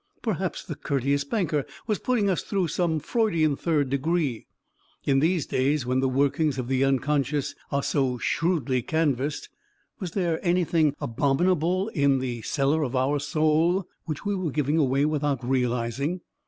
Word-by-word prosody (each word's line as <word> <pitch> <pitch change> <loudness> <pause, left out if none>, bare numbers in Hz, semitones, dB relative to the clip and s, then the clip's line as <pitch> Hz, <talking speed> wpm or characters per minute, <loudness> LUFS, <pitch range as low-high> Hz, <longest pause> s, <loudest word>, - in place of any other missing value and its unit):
Perhaps - - -2
the - - -5
courteous 140 +1 0
banker 155 -3 0 0.2
was 215 -3 -1
putting 240 -5 +1
us 185 -3 +1
through 190 -5 -1
some 160 0 0
Freudian 165 - +1
third 145 -4 0
degree... 140 -3 -1 0.6
in 135 -1 +3
these 165 0 +1
days 135 +1 0
when 130 +1 +1
the 135 0 +1
workings 140 +2 +1
of 125 -2 -3
the 130 +1 +1
unconscious 140 +1 0 0.2
are 140 0 0
so 130 -3 0
shrewdly 140 -4 0
canvassed, 150 0 -1 0.5
was 185 -6 -5
there 175 -5 -1
anything 170 -4 +2
abominable 165 - +1
in 140 -8 +2
the 125 -3 -3
cellar 140 +6 +1
of 135 -3 -2
our 135 +3 +1
soul 155 +5 +1 0.2
which 155 +3 -5
we 205 - 0
were 185 -4 -1
giving 150 +2 0
away 140 0 +2
without 145 -5 -1
realizing 125 +6 -1
145 Hz, 155 wpm, -26 LUFS, 135-170 Hz, 0.6 s, in